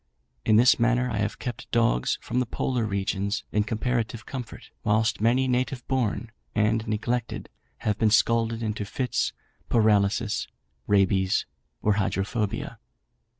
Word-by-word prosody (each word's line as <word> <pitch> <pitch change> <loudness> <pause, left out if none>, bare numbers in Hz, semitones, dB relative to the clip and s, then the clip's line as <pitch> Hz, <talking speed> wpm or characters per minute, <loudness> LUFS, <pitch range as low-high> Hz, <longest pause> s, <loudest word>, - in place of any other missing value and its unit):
In 110 - +4
this 125 +3 +6
manner 125 +1 +2
I 110 - -2
have 105 0 -1
kept 120 -2 -6
dogs 115 - +2
from 125 - -1
the 125 - 0
polar 125 0 -1
regions, 100 +1 -1
in 105 - +2
comparative 115 +1 -2
comfort, 125 -4 -7
whilst 110 0 +1
many 125 +4 +3
native 125 0 -1
born 120 -3 -1 0.2
and 110 +1 +1
neglected 115 +2 -2 0.4
have 105 -1 +1
been 110 - +4
scalded 115 +1 +2
into 105 -1 -2
fits, 125 +5 -1 0.4
paralysis, 105 0 +2 0.4
rabies, 95 -2 +3 0.4
or 105 -2 +3
hydrophobia. 100 +2 -2
110 Hz, 130 wpm, -26 LUFS, 105-120 Hz, 0.4 s, this